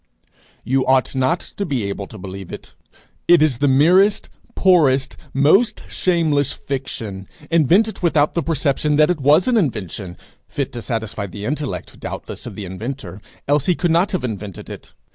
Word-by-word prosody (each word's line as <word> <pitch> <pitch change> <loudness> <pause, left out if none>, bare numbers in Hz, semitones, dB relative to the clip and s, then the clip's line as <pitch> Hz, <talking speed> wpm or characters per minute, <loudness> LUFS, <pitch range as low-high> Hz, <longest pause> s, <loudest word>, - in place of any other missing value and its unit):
You 130 +1 +1
ought 130 0 +3
not 130 +5 +1 0.2
to 200 - -1
be 135 - -2
able 100 0 -4
to 110 - -11
believe 95 -1 -8
it. - - -10 0.5
It 170 -3 +6
is 135 -6 +1
the 145 - +2
merest, 180 +10 +4 0.3
poorest, 150 -8 +3 0.2
most 195 - +3
shameless 155 -6 +1
fiction, 110 -8 -5 0.2
invented 175 - +3
without 155 -4 +2
the 170 - 0
perception 150 -2 0
that 155 +3 +4
it 175 - -2
was 150 +6 +4
an 250 -2 +3
invention 105 - -2 0.3
fit 140 -1 -4
to 120 - -5
satisfy 110 -4 -3
the 100 +2 -7
intellect, 150 +1 -4
doubtless, - - -7
of - - -8
the 105 - -6
inventor, 110 +3 -7 0.3
else 145 0 +1
he 180 - +3
could 175 -1 0
not 175 +5 +2
have 185 - -2
invented 105 -5 -6
it. - - -11
140 Hz, 165 wpm, -20 LUFS, 115-170 Hz, 0.5 s, It